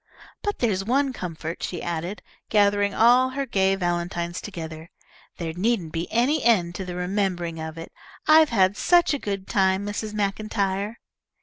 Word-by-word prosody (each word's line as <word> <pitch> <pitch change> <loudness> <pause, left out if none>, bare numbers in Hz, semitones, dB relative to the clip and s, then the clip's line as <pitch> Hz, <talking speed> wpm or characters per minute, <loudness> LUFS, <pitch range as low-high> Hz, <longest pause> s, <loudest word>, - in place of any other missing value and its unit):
"But 410 -1 -2
there's 200 -6 0
one 265 +5 +1
comfort," 165 -5 -6
she 175 - -3
added, 175 +4 -4 0.3
gathering 205 -1 +3
all 245 +5 +5
her 275 +1 -3
gay 195 -5 +2
valentines 175 -1 -2
together, 160 -4 -7 0.5
"there 165 -2 -4
needn't 185 -2 0
be 165 +1 -3
any 260 +6 +2
end 185 -8 +3
to 190 - -5
the 180 -1 -6
remembering 180 -2 -2
of 160 0 -6
it. 165 - -8 0.4
I've 310 0 +7
had 195 -3 +3
such 350 -3 +4
a 285 - -1
good 200 -4 -4
time, 190 0 +2
Mrs. 210 +1 -4
MacIntyre." 205 0 -1
195 Hz, 160 wpm, -24 LUFS, 175-225 Hz, 0.5 s, I've